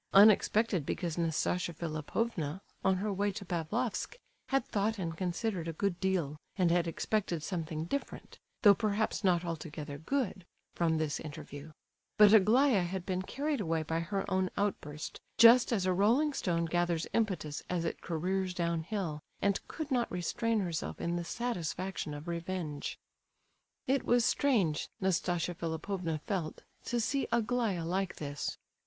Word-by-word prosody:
Unexpected 210 -2 +6
because 170 +3 -2
Nastasia 170 +1 0
Philipovna, 160 +2 -2 0.2
on 190 0 +4
her 205 +2 -1
way 200 +1 +1
to 200 0 -6
Pavlofsk, 185 +8 -2 0.3
had 270 -2 +1
thought 215 +2 0
and 165 -4 -3
considered 180 0 -2
a 165 - -2
good 195 -3 0
deal, 175 -7 0 0.2
and 180 -4 +3
had 175 0 +2
expected 170 -1 -1
something 160 -3 -3
different, 280 +11 -5 0.2
though 205 -2 +9
perhaps 215 +1 0
not 180 -2 +3
altogether 155 -3 -5
good, 220 - -1 0.3
from 165 -2 +1
this 155 -2 -1
interview; 145 0 -8 0.5
but 210 0 +8
Aglaya 220 +2 +5
had 180 +1 -3
been 185 -1 -1
carried 285 +7 -2
away 165 -3 0
by 160 +1 -1
her 195 +4 -2
own 185 -1 +1
outburst, 155 -7 -3 0.2
just 235 +2 +8
as 200 -6 +1
a 185 - +3
rolling 240 +11 +3
stone 170 -8 0
gathers 175 0 0
impetus 180 -9 -1
as 175 -2 -1
it - - -3
careers 185 +2 -1
downhill, 170 -1 -2 0.2
and 200 0 +2
could 310 -3 -5
not 245 -2 +1
restrain 215 +5 0
herself 170 -4 -3
in 170 0 -1
the 175 - -2
satisfaction 185 -6 -3
of 145 +3 -8
revenge. 170 -3 -3 0.9
It 270 +1 +2
was 240 -1 +3
strange, 220 - +2
Nastasia 175 -2 0
Philipovna 165 +1 -3
felt, 180 -6 -3 0.2
to 240 - 0
see 275 +4 0
Aglaya 230 -6 +1
like 185 +2 -1
this. 145 -2 -4
180 Hz, 150 wpm, -32 LUFS, 165-210 Hz, 0.9 s, though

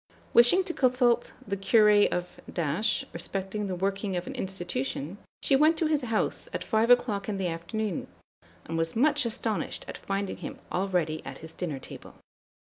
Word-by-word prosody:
Wishing 245 +11 +6
to 350 -2 -4
consult 250 -3 +2 0.2
the 200 - -1
Curé 205 +1 +5
of 180 0 -3 0.7
respecting 195 +4 -3
the 185 - -2
working 195 +1 -1
of 175 - -3
an - - -6
institution, 175 -2 -4 0.2
she 275 - +4
went 310 +4 +5
to 325 - +1
his 305 -2 +2
house 225 -3 -1
at - - -2
five 220 +1 +2
o'clock 220 -5 +3
in 200 - -1
the 190 - -1
afternoon, 175 +4 -3 0.6
and 165 0 -2
was 165 0 -1
much 285 +1 +3
astonished 225 -2 -2
at - - -7
finding 195 0 -2
him - - -7
already 180 -4 0
at - - -7
his 160 - -11
dinner 160 -6 -3
table. - - -11
200 Hz, 165 wpm, -28 LUFS, 180-235 Hz, 0.7 s, Wishing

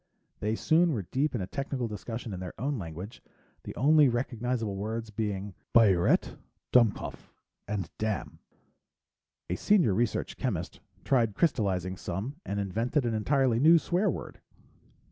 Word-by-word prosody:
They 105 +1 0
soon 165 +5 +3
were 105 -6 -2
deep 140 +1 0
in 115 - -1
a - - -2
technical 135 +2 -3
discussion 115 +1 -6
in 90 - -5
their 90 -1 -8
own 135 +1 -1
language, 90 +6 -7 0.4
the - - -7
only 150 +1 +5
recognizable 120 -3 -2
words 110 +3 -4
being 100 -2 -3 0.2
"biuret," 100 -7 +4 0.3
"dumkopf," 115 -5 +2 0.4
and 100 -4 -2
"damn." 110 -3 -3 1.1
A 90 - -1
senior 180 - +3
research 115 +3 -1
chemist - - -3 0.2
tried 115 -6 +2
crystalizing 95 - 0
some 105 - -4
and 100 - -3
invented 115 - 0
an 115 - 0
entirely 125 +2 +2
new 160 +5 +7
swear 180 +5 +1
word. - - -6
115 Hz, 140 wpm, -29 LUFS, 100-135 Hz, 1.1 s, new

